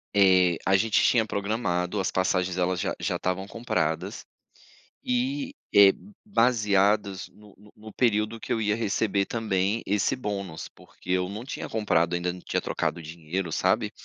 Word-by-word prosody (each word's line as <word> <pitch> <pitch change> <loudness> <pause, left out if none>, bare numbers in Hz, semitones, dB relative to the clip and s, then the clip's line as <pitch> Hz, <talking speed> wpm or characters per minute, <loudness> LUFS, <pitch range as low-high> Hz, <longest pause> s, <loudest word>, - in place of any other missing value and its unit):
Eh, 95 -3 +5
a 95 - +4
gente 110 +2 +3
tinha 120 -2 +4
programado, 100 -3 -2
as 95 - 0
passagens 95 -1 0
elas 90 0 0
já - - -2
já - - -1
estavam 90 +1 -2
compradas, 85 -9 -2 0.8
e, 265 +2 -1 0.2
eh, 100 -1 +9 0.3
baseadas 105 - +2
no 105 -1 -18
no 105 +2 -18
no 110 0 -12
período 110 -2 +1
que - - -3
eu 115 - -1
ia 105 -1 +1
receber 105 -2 0
também 105 -1 -1
esse 105 +6 +1
bônus. 100 -9 -5
Porque - - -11
eu 90 0 +1
não 105 +4 -6
tinha 135 - -6
comprado 90 -6 +1
ainda, 90 0 -1
não 90 - -9
tinha - - -2
trocado 85 - -2
dinheiro, 85 +2 -5
sabe. - - +1
100 Hz, 160 wpm, -26 LUFS, 90-110 Hz, 0.8 s, eh